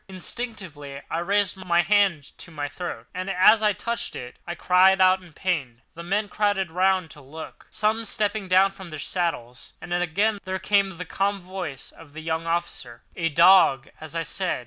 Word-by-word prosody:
Instinctively 185 Hz, -, -6 dB
I 165 Hz, -, -1 dB
raised 200 Hz, +2 st, +1 dB
my 175 Hz, -2 st, +1 dB
hand 190 Hz, -6 st, +1 dB
to -, -, -7 dB
my 150 Hz, -3 st, -4 dB
throat, 145 Hz, -6 st, -6 dB
and 185 Hz, +1 st, -4 dB
as 195 Hz, +4 st, +5 dB
I 210 Hz, -1 st, +3 dB
touched 235 Hz, +3 st, -4 dB
it 125 Hz, 0 st, -8 dB
I 175 Hz, -, -4 dB
cried 185 Hz, +2 st, +4 dB
out 185 Hz, 0 st, +5 dB
in 180 Hz, -2 st, -16 dB
pain. 145 Hz, -8 st, -3 dB
The 170 Hz, -, -9 dB
men 200 Hz, +5 st, -1 dB
crowded 200 Hz, -3 st, 0 dB
round 185 Hz, -1 st, +1 dB
to 150 Hz, -, -12 dB
look, 150 Hz, +4 st, -11 dB
some 220 Hz, +2 st, 0 dB
stooping 210 Hz, -1 st, -1 dB
down 190 Hz, +2 st, +4 dB
from 190 Hz, -2 st, -11 dB
their 155 Hz, -, -7 dB
saddles; 145 Hz, -7 st, -3 dB
and 175 Hz, +2 st, -6 dB
again 195 Hz, +5 st, 0 dB
there 190 Hz, 0 st, -3 dB
came 195 Hz, -1 st, +1 dB
the 180 Hz, -, -6 dB
calm 200 Hz, +1 st, -1 dB
voice 180 Hz, -7 st, -7 dB
of 145 Hz, -3 st, -16 dB
the 160 Hz, -, -8 dB
young 160 Hz, +1 st, -3 dB
officer: 130 Hz, -8 st, -4 dB
"A 165 Hz, -1 st, 0 dB
dog, 170 Hz, -5 st, +5 dB
as 155 Hz, +1 st, -7 dB
I 165 Hz, -, -1 dB
said. 185 Hz, 0 st, -2 dB
180 Hz, 190 wpm, -24 LUFS, 160-195 Hz, -, as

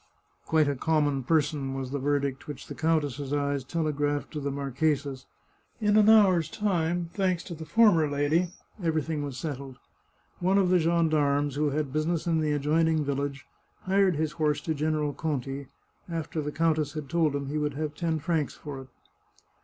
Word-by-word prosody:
Quite 155 Hz, -2 st, +3 dB
a 145 Hz, -, 0 dB
common 145 Hz, -1 st, +1 dB
person," 145 Hz, -1 st, 0 dB
was 130 Hz, -1 st, -4 dB
the 140 Hz, -, -2 dB
verdict 140 Hz, -1 st, -1 dB
which 145 Hz, -2 st, -7 dB
the -, -, -7 dB
85 -, -, -15 dB
The -, -, -12 dB, 0.3 s
Chartreuse 125 Hz, -, -9 dB
of 140 Hz, -2 st, -5 dB
Parma 145 Hz, 0 st, 0 dB
countess's 140 Hz, -1 st, -1 dB
eyes 130 Hz, -, -18 dB
telegraphed 145 Hz, -3 st, -1 dB
to 155 Hz, -, -4 dB
the 140 Hz, 0 st, -2 dB
marchesa's. 140 Hz, 0 st, -1 dB, 0.5 s
In 210 Hz, -2 st, +2 dB
an 215 Hz, 0 st, +6 dB
hour's 190 Hz, -7 st, +5 dB
time, 175 Hz, -3 st, -1 dB
thanks 185 Hz, -3 st, 0 dB
to 175 Hz, -, -7 dB
the 160 Hz, -1 st, -8 dB
former 205 Hz, -10 st, +4 dB
lady, 145 Hz, +5 st, +1 dB, 0.3 s
everything 160 Hz, -2 st, -1 dB
was 140 Hz, -3 st, -5 dB
settled. 135 Hz, -4 st, -5 dB, 0.6 s
One 185 Hz, +2 st, +2 dB
of 190 Hz, -2 st, +3 dB
the 180 Hz, 0 st, +4 dB
gendarmes, 155 Hz, -4 st, +2 dB
who 150 Hz, +2 st, +1 dB
had 145 Hz, -1 st, -2 dB
business 155 Hz, +2 st, 0 dB
in 165 Hz, -2 st, +2 dB
the 150 Hz, -1 st, +1 dB
adjoining 155 Hz, +2 st, +2 dB
village, 140 Hz, -2 st, -3 dB, 0.4 s
hired 190 Hz, -1 st, +3 dB
his 155 Hz, 0 st, -1 dB
horse 150 Hz, -2 st, 0 dB
to 160 Hz, -, -1 dB
General 150 Hz, -1 st, 0 dB
Conti, 140 Hz, -2 st, -3 dB, 0.4 s
after 165 Hz, -1 st, -3 dB
the 150 Hz, 0 st, -3 dB
countess 155 Hz, -2 st, +1 dB
had 155 Hz, -2 st, -5 dB
told 155 Hz, -1 st, +1 dB
him 140 Hz, -1 st, -3 dB
he 150 Hz, +1 st, -1 dB
would 150 Hz, -2 st, -1 dB
have 150 Hz, 0 st, -3 dB
ten 165 Hz, 0 st, -1 dB
francs 155 Hz, -1 st, -1 dB
for 140 Hz, -3 st, -7 dB
it. 130 Hz, -, -12 dB
150 Hz, 190 wpm, -28 LUFS, 140-165 Hz, 0.6 s, an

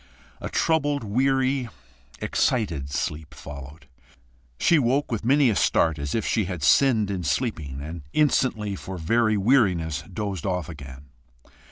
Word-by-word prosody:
A -, -, -4 dB
troubled, 145 Hz, -4 st, +1 dB
weary, 130 Hz, +3 st, +1 dB, 0.5 s
EXCITED 85 Hz, -, 0 dB
sleep 75 Hz, +1 st, -4 dB
followed. 70 Hz, +2 st, -10 dB, 0.7 s
She 165 Hz, -, +4 dB
woke 135 Hz, +2 st, +1 dB
with 115 Hz, -2 st, -2 dB
many 135 Hz, +1 st, +4 dB
a -, -, -1 dB
start, 80 Hz, -4 st, +2 dB
as 70 Hz, 0 st, -3 dB
if 115 Hz, -, -1 dB
she 110 Hz, -3 st, +1 dB
had 90 Hz, -5 st, -5 dB
sinned 110 Hz, -, +4 dB
in 95 Hz, -3 st, -3 dB
sleeping, 75 Hz, -, -2 dB
and 80 Hz, +2 st, -7 dB
instantly 120 Hz, -8 st, +1 dB
for 95 Hz, 0 st, -7 dB
very 110 Hz, +6 st, +2 dB
weariness, 95 Hz, -, +2 dB
dozed 100 Hz, -2 st, -4 dB
off 90 Hz, -4 st, -2 dB
again. 70 Hz, -3 st, -11 dB
100 Hz, 140 wpm, -25 LUFS, 80-125 Hz, 0.7 s, She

